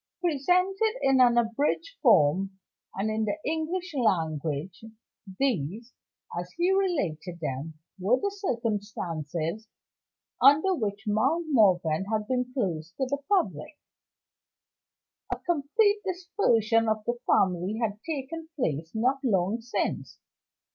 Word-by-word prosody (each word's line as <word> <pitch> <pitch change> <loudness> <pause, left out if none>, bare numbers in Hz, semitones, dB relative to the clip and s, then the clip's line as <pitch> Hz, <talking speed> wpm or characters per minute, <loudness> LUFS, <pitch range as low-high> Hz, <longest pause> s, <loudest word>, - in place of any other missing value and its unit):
Presented 365 - +2
in 270 -1 +4
an 240 -1 +5
abridged 280 - 0
form, 190 - +4 0.4
and 205 +3 -1
in 220 0 0
the 215 - -1
English 325 +4 -2
language, 165 - -1 0.6
these 230 - -1 0.4
(as 175 +1 -5
he 350 +2 +2
related 195 - -1
them) 150 +1 -4 0.2
were 215 +8 +2
the 405 - -1
circumstances 205 - -3 0.7
under 310 +7 +6
which 205 - -3
Mount 260 +11 +1
Morven 185 - +3
had 215 -1 -1
been 250 0 -1
closed 180 - -3
to 265 - 0
the 280 +2 -3
public. 290 - 0 1.5
A - - -1
complete 350 +7 +1
dispersion 240 - +1
of 215 -1 -1
the 240 0 -2
family 185 +2 +2
had 210 -3 -2
taken 320 +1 -5
place 160 - -2
not 255 +5 +1
long 205 -1 +1
since. 240 +2 -3
230 Hz, 115 wpm, -27 LUFS, 185-300 Hz, 1.5 s, under